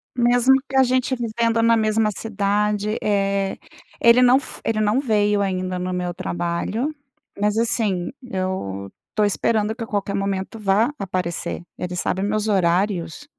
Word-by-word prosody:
Mesmo 245 +2 +4
que 270 - -5
a 265 - +6
gente 255 +1 +1
vivendo 230 -1 0
na 230 0 +5
mesma 215 0 +2
cidade, 210 0 -1
eh, 195 -1 0 0.4
ele 235 +2 +6
não 250 +1 +6
f 280 - -8
Ele 215 -1 0
não 215 +5 +2
veio 210 -5 +2
ainda 185 -2 -2
no 180 0 -3
meu 180 -1 -2
trabalho, 175 - -2 0.5
mas 210 +1 +1
assim, 210 -6 0
eu 185 - -4 0.2
tô 215 - +2
esperando 210 +1 +1
que 230 +1 -6
a - - -18
qualquer 200 -1 -2
momento 195 +2 -3
vá 210 +5 +2
aparecer. 180 -3 -3
Ele 180 0 -4
sabe 180 +1 -1
meus 215 +2 0
horários. 180 - 0
205 Hz, 150 wpm, -22 LUFS, 190-230 Hz, 0.5 s, a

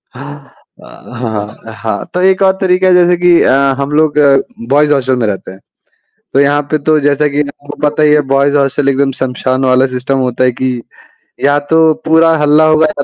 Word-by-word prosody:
हाँ 125 -5 -9
अ, - - -8
हाँ, 110 -1 -5
तो 180 - -1
एक 190 +1 +2
और 190 - +3
तरीका 185 0 +2
जैसे 175 0 +3
कि 175 -1 +3
अ, - - +2 0.2
हम 140 +1 -4
लोग 155 -1 +1 0.5
बॉयज़ 150 +1 +2
हॉस्टल 130 -2 0
में 120 -3 -1
रहते 95 -2 -5
हैं। 95 - -14 0.7
तो 135 - +2
यहाँ 145 +1 +1
पे 155 - 0
तो 155 -1 +4
जैसा 145 +1 +1
कि 145 +1 -2
आपको 145 +1 -11
पता 150 +1 -2
ही 150 -1 +3
है 150 - +4
बॉयज़ 140 +1 +1
हॉस्टल 140 0 0
एकदम 140 0 +1
श्मशान 130 0 -2
वाला 130 0 +2
सिस्टम 130 +1 -3
होता 125 +1 -1
है 125 - +1
कि, 130 +2 -3 0.7
या 145 +1 +2
तो 160 -1 +4
पूरा 160 0 +3
हल्ला 150 +1 +3
होगा 155 0 +3
या 145 -2 -4
145 Hz, 195 wpm, -12 LUFS, 130-155 Hz, 0.7 s, तो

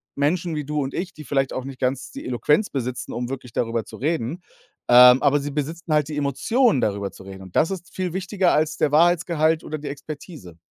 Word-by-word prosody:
Menschen 165 +3 0
wie 150 - -3
du 150 +1 -1
und 135 0 -4
ich, 180 +1 -4
die 155 - -10
vielleicht 135 -2 0
auch 130 - -3
nicht 135 -1 -8
ganz 130 0 -2
die - - -9
Eloquenz 150 - +1
besitzen, 125 -2 -4
um 120 0 -3
wirklich 125 -3 -7
darüber 115 -1 -1
zu - - -11
reden. 155 +2 -2 0.5
Ähm, 125 +1 +8
aber 145 0 +4
sie 145 +1 -4
besitzen 155 +3 -3
halt 150 0 +2
die 150 - -4
Emotionen, 170 - +2
darüber 100 -1 -1
zu - - -14
reden. 95 0 -10
Und 95 - -14
das 165 +5 +3
ist 175 -2 -7
viel 185 -2 -2
wichtiger 190 0 +1
als 155 +1 +1
der 150 -2 +1
Wahrheitsgehalt 165 -1 +3
oder 155 - -5
die 150 0 -8
Expertise. 145 - -9
145 Hz, 220 wpm, -23 LUFS, 125-165 Hz, 0.5 s, Ähm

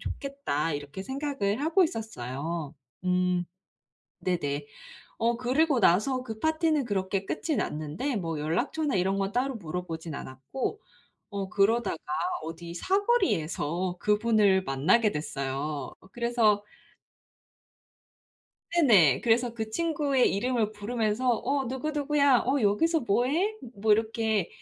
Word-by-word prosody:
좋겠다.' 275 - -3
이렇게 145 +5 -5
생각을 265 -4 -2
하고 330 +5 +4
있었어요. 165 - -4 0.3
음. 180 -1 +1 0.8
네네. 145 -5 -1 0.5
어 230 +1 +1
그리고 265 +3 +2
나서 230 +8 +3
그 220 -3 -6
파티는 315 -1 +1
그렇게 195 -2 -1
끝이 310 +4 -2
났는데 155 - -2
뭐 165 -6 -2
연락처나 245 - -1
이런 190 +1 +1
건 195 0 -1
따로 255 +3 0
물어 180 -3 -5
보진 160 -1 -6
않았고 140 - -5 0.5
어 195 -1 -3
그러다가 215 0 +2 0.5
어디 165 +1 -7
사거리에서 185 - 0
그분을 210 -2 +3
만나게 185 - +3
됐어요. 145 -1 -3 0.2
그래서 235 -4 +2 2.1
네네. 195 - +6
그래서 235 +1 +2
그 220 -2 -4
친구의 290 -3 +1
이름을 225 +1 0
부르면서 220 +3 -1
"어 265 +3 +1
누구 265 +5 -3
누구야 285 -3 +3
어 270 +2 +2
여기서 315 +12 +3
뭐해?" 290 - +1 0.2
뭐 215 +1 -1
이렇게 220 -2 +1
215 Hz, 265 characters per minute, -28 LUFS, 175-265 Hz, 2.1 s, 네네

